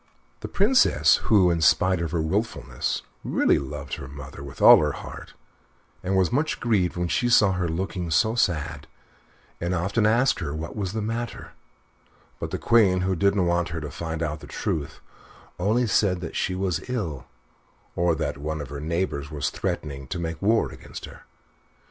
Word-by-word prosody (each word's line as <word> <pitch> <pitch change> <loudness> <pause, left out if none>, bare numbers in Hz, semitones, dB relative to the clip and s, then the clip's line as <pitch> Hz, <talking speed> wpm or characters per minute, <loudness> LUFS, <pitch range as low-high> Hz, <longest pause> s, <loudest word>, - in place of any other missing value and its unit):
The - - -6
Princess, 235 +7 +4
who, 95 -5 +5
in 85 -1 0
spite 90 +2 +3
of 85 - -2
her 80 -1 -1
wilfulness, 80 - -2 0.2
really - - +2
loved 70 0 -7
her 65 - -8
mother 70 0 -10
with 70 -2 -10
all - - +9
her - - 0
heart, - - -9 0.7
was 95 -1 +1
much 150 +5 0
grieved 100 -8 +1
when 90 0 0
she 85 +10 +1
saw 105 -5 +5
her 90 -2 -1
looking 90 +1 -3
so 110 +8 +3
sad, 90 -11 -1 0.7
and 85 +1 -1
often 100 +5 +1
asked 125 +5 +3
her 75 -4 -4
what 80 +2 -6
was 100 -3 -3
the 110 -1 -2
matter; 115 +2 -4 0.9
but - - -4
the - - -3
Queen, 100 -6 +4
who 95 0 0
didn't 100 +1 +2
want 85 0 +1
her 80 0 -4
to 75 -1 -6
find 80 -1 -4
out 75 -1 -3
the - - -12
truth, 75 0 -3 0.6
only 110 +7 +2
said 100 -4 +2
that 85 - -6
she 90 - -1
was 95 +2 -2
ill, 85 - -3 0.7
or 85 -1 +2
that 70 - -3
one 80 +2 -3
of 70 -3 -6
her 70 0 -6
neighbors 80 -3 -2
was 75 -1 -2
threatening 70 -3 -4
to 90 - -4
make 80 -2 -4
war 110 +3 +2
against - - -9
her. - - -14
90 Hz, 180 wpm, -25 LUFS, 80-100 Hz, 0.9 s, all